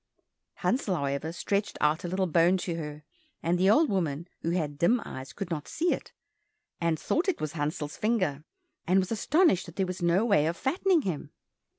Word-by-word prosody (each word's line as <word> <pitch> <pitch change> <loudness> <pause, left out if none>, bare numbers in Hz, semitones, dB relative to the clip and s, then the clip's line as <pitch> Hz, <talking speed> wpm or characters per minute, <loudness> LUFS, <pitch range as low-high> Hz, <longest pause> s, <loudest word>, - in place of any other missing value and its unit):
Hansel, 220 -7 0
however, 140 +1 -2
stretched 200 +4 -2
out 150 +2 +2
a - - -2
little 185 +2 0
bone 175 +2 +4
to 175 -1 -3
her, 150 -2 -6 0.4
and 175 +2 +1
the 190 +1 +4
old 305 +9 +5
woman, 170 - -1
who 165 - -1
had 155 -5 -2
dim 230 +9 +4
eyes, 130 -1 -7
could 180 +6 -6
not 150 -3 -3
see 345 +2 +1
it, - - -6 0.7
and 170 -2 +1
thought 355 +5 0
it 370 - -1
was 155 -1 -3
Hansel's 150 0 -3
finger, 185 -11 0 0.4
and 185 +2 +4
was 190 +1 +1
astonished 250 - +3
that 170 - -11
there 190 - +1
was 185 -1 -5
no 175 +5 +3
way 200 -9 +3
of 170 +1 -2
fattening 340 +4 +2
him. 170 -7 -3
175 Hz, 195 wpm, -28 LUFS, 155-205 Hz, 0.7 s, old